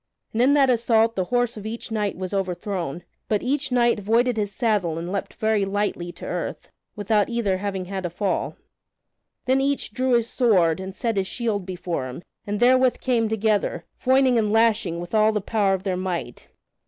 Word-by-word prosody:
And 225 - +1
in 275 +3 +5
that 275 -3 +5
assault 230 -1 +2
the 185 - 0
horse 245 +1 0
of 210 - -8
each 230 +1 -6
knight 210 -4 -1
was 185 +1 -5
overthrown, 180 -4 -3 0.3
but 210 -2 +1
each 275 +1 -1
knight 240 -2 +3
voided 230 +4 +2
his 205 -2 -1
saddle 200 -7 0
and 170 +2 -4
leaped 200 - -4
very 220 -2 +1
lightly 195 -3 -2
to - - -10
earth, - - -5 0.2
without 205 0 +1
either 225 -6 0
having 195 -2 -3
had 190 0 -5
a 175 - -2
fall. 185 +2 -2 0.9
Then 260 +1 +2
each 275 -5 -1
drew 255 +1 +1
his 235 -1 +3
sword 185 -11 +3
and 190 0 -7
set 230 -2 -1
his 190 -1 0
shield 210 -5 -2
before 175 -7 -3
him, 130 +7 -8 0.2
and 205 0 -2
therewith 255 +1 +4
came 235 -4 +1
together, 215 -1 0 0.2
foining 260 -2 +4
and 210 -2 0
lashing 220 -6 +2
with 175 +3 -8
all 215 0 +4
the 215 - 0
power 200 -1 +1
of 190 - -7
their 190 -3 -1
might. 175 -10 -4
210 Hz, 190 wpm, -24 LUFS, 190-235 Hz, 0.9 s, in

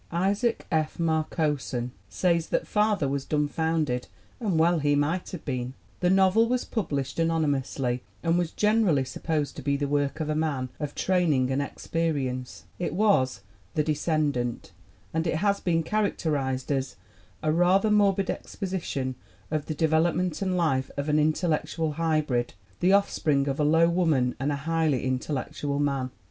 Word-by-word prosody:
Isaac 200 +7 0
F. 155 -1 0
Marcosson 155 -6 -1 0.2
says 170 - +1
that - - 0
Father 210 -7 +1
was 140 0 -1
dumb 150 0 0
founded, 155 -5 -1 0.3
and 200 -8 0
well 165 +1 +4
he 145 0 +2
might 155 +6 0
have 180 -5 -8
been. 125 -2 -3 0.2
The 180 - +2
novel 190 +4 +4
was 250 0 0
published 150 - -2
anonymously 140 -6 0 0.2
and 165 0 +2
was 175 -2 +1
generally 210 -10 +2
sup 130 - -8
posed 155 -3 -1
to - - -5
be 140 +1 0
the 145 0 -1
work 145 +1 0
of 155 - -2
a 155 - 0
man 150 -5 -1
of 145 -1 -4
training 155 -9 +2
and 135 +2 +1
ex 140 - -7
perience. 135 -7 -2 0.2
It 175 - -2
was 150 - +2 0.3
The 150 - +2
Descendant, 150 -5 -1 0.4
and 160 +1 0
it 165 - 0
has 200 +4 +1
been 165 -2 +1
characterized 150 -10 -1
as 135 -1 -1 0.5
"a 155 - +2
rather 185 +6 +3
morbid 200 -2 +3
exposition 175 -9 -4 0.4
of 155 -2 -1
the 155 - -3
development 165 +2 +1
and 185 -2 0
life 135 -6 +1
of 140 +2 -2
an 150 0 +3
intellectual 155 0 0
hybrid, 150 -7 0 0.2
the 180 - +3
off 200 0 +4
spring 140 -2 +1
of 140 +1 -2
a - - +3
low 160 +3 +5
woman 160 -8 +2
and 140 +3 0
a - - 0
highly 160 -6 +1
intellectual 140 +2 -2
man." 140 -3 0
155 Hz, 165 wpm, -27 LUFS, 140-175 Hz, 0.5 s, low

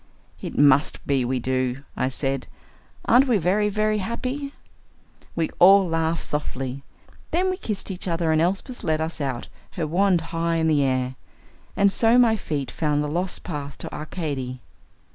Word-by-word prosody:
"It - - -6
must 145 0 +4
be 135 -2 +1
we 130 +2 -1
do," 130 +1 -1
I 130 - 0
said. 135 0 -2 0.6
"Aren't 255 +4 +5
we 240 -4 +3
very, 200 +4 +2
very 215 +1 +1
happy?" 255 +7 -3 0.8
We 165 -2 -1
all 195 +1 +7
laughed 165 0 0
softly. 135 -2 -3 0.5
Then 370 +2 +1
we - - -1
kissed 210 - -3
each 185 0 -5
other 165 -2 0
and 155 0 +3
Elsbeth 195 +8 -1
led 155 0 +1
us 160 0 -3
out, 130 -4 -3 0.3
her 165 - -2
wand 180 +2 +2
high 165 0 0
in 160 -1 +1
the 150 -2 +3
air. 130 -1 0 0.6
And 200 0 +4
so 230 +1 +4
my 235 -3 +5
feet 145 - -3
found 150 -2 0
the - - -2
lost 175 +5 -2
path 145 -4 -5
to - - -8
Arcady. 145 -5 -4
165 Hz, 165 wpm, -24 LUFS, 140-200 Hz, 0.8 s, all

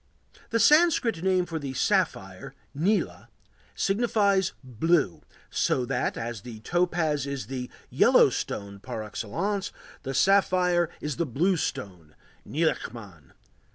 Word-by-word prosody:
The 230 - +1
Sanskrit 275 - +4
name 185 -1 +2
for 165 -2 -4
the 140 -3 -5
sapphire, - - -1 0.2
nîla, 195 +8 0 0.5
signifies 200 -3 +1
"blue," 130 - +1 0.3
so 125 - +1
that, 135 - -1
as 115 -3 -5
the 115 0 -9
topaz 160 -2 0
is 140 -2 -4
the 130 -2 -5 0.2
"yellow - - +5
stone" 100 -1 -4
par 110 +2 -6
excellence, 175 - -3 0.3
the 135 0 -5
sapphire 180 -1 +3
is 150 -2 -3
the 170 -2 -1
blue 170 +10 +1
stone 90 - -5 0.3
(nilaçman). 110 - -3
160 Hz, 120 wpm, -27 LUFS, 120-190 Hz, 0.5 s, yellow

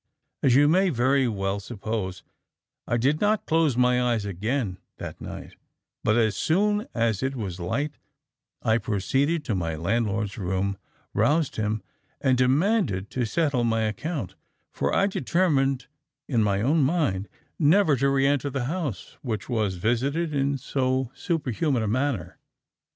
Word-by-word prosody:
As 125 -3 +4
you 145 +2 +6
may 185 +5 +4 0.4
well 100 -2 -1
suppose, 100 -3 -4 0.6
I 120 - +1
did 140 +6 +1
not 210 0 +2
close 160 -6 +2
my 125 0 +3
eyes 120 -4 +1
again 100 +1 -2 0.2
that - - -7
night, - - -8 0.5
but 110 - +3
as 110 -3 +2
soon 205 - +1
as 115 -4 +1
it 135 +1 -1
was 95 -7 -4
light 140 - -2 0.6
I 110 +1 +3
proceeded 135 - 0
to 115 - -1
my 85 -4 -1
landlord's 105 +4 -1
room, 95 +1 -1 0.3
roused 155 -1 +2
him, 110 -1 -1 0.4
and 130 -2 +3
demanded 130 - +2
to 125 -2 -1
settle 140 +1 +1
my 115 -1 +1
account, 110 - -3 0.4
for - - -1
I 195 - +3
determined 140 -7 +1 0.4
in 120 -5 +2
my 100 -1 +1
own 150 +6 +3
mind 135 - +1 0.3
never 160 0 +5
to 140 +2 +2
re 135 0 +2
enter 140 0 +1
the 135 -2 -2
house 145 - -4
which 110 -4 -4
was 110 -6 0
visited 135 - 0
in 140 0 +1
so 130 -1 -1
superhuman 145 - -1
a - - -1
manner. 125 - -1
125 Hz, 145 wpm, -26 LUFS, 105-145 Hz, 0.6 s, you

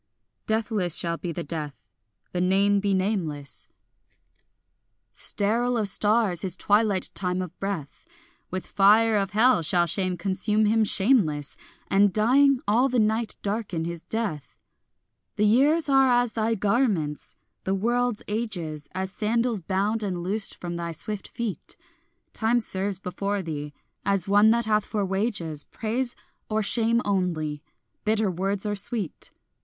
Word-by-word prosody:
Deathless 220 -6 0
shall 170 -1 0
be 175 - -5
the 170 +1 -5
death, 150 -2 -5 0.6
the 180 - -2
name 200 +2 +3
be 200 0 -1
nameless; 185 -8 -2 1.5
Sterile 235 +4 +4
of 215 -2 0
stars 205 -3 +2
his 185 -1 -2
twilight 205 -2 +2
time 180 -1 -1
of 180 -1 -5
breath; 195 -8 -5 0.5
With 185 0 -4
fire 215 +3 +4
of 195 -2 -1
hell 230 -2 +4
shall 175 +2 +2
shame 185 +1 -1
consume 200 +4 0
him 220 +1 +3
shameless, 190 - +2 0.3
And 200 0 +4
dying, 255 +6 +3
all 240 +6 +3
the 250 - 0
night 220 0 +1
darken 200 -6 -2
his 170 -1 -6
death. 210 -11 -4 0.8
The 210 - +2
years 285 +10 +3
are 270 -1 +4
as 245 -1 +2
thy 225 0 0
garments, 200 - -1 0.3
the 190 - 0
world's 240 +2 0
ages 180 -9 -4
As 190 0 -3
sandals 230 +2 0
bound 195 +5 -1
and 185 -4 -3
loosed 200 +3 -1
from 175 -1 -5
thy 170 -1 -4
swift 205 +5 -6
feet; 230 -5 -4 0.6
Time 225 +2 +1
serves 195 -3 -2
before 195 +2 -3
thee, 150 -3 -5 0.3
as 195 -2 0
one 205 +2 +5
that 235 0 +2
hath 215 -1 +2
for 210 -1 -2
wages 190 -6 -2
Praise 240 +3 -3 0.3
or 215 0 0
shame 230 +3 +2
only, 170 -7 -1 0.4
bitter 215 -2 +1
words 195 +3 -2
or 210 - -1
sweet. 205 - -3
200 Hz, 140 wpm, -25 LUFS, 180-225 Hz, 1.5 s, one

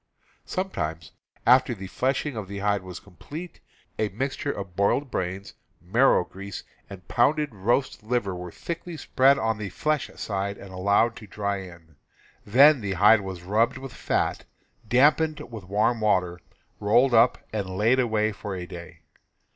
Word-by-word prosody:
Sometimes, 85 - -3 0.3
after 125 0 +5
the 95 -2 -8
fleshing 135 +7 -1
of 105 -3 -5
the 100 +1 -7
hide 100 0 0
was 90 -1 -8
completed, 145 - -10 0.4
a 110 - +1
mixture 135 +6 -3
of 95 -6 -7
boiled 125 +8 +1
brains, 95 +2 -4 0.3
marrow 105 +4 +3
grease, 100 0 -8 0.3
and 95 -2 -11
pounded 145 +2 +2
roast 120 +8 0
liver 110 -3 -1
was 90 -1 -8
thickly 170 0 -6
spread 135 0 +3
on 115 -3 -1
the 105 -2 -4
flesh 150 +9 -1
side 100 0 -3
and 95 -1 -11
allowed 100 +5 +2
to 110 - -11
dry 100 0 -2
in; 85 -5 -12 0.5
then 135 +5 +6
the 100 -2 -2
hide 105 +4 +6
was 95 -3 -7
rubbed 110 +7 +1
with 135 -2 -8
fat, - - -1 0.4
dampened 150 +6 +3
with 110 -5 -8
warm 105 +4 +1
water, 90 -5 +1 0.4
rolled 120 +5 +3
up 115 +2 +5 0.2
and 100 -3 -2
laid 115 +6 +3
away 110 -3 +1
for 100 -1 -6
a 90 -1 -5
day. 85 -1 -11
105 Hz, 155 wpm, -25 LUFS, 95-125 Hz, 0.5 s, then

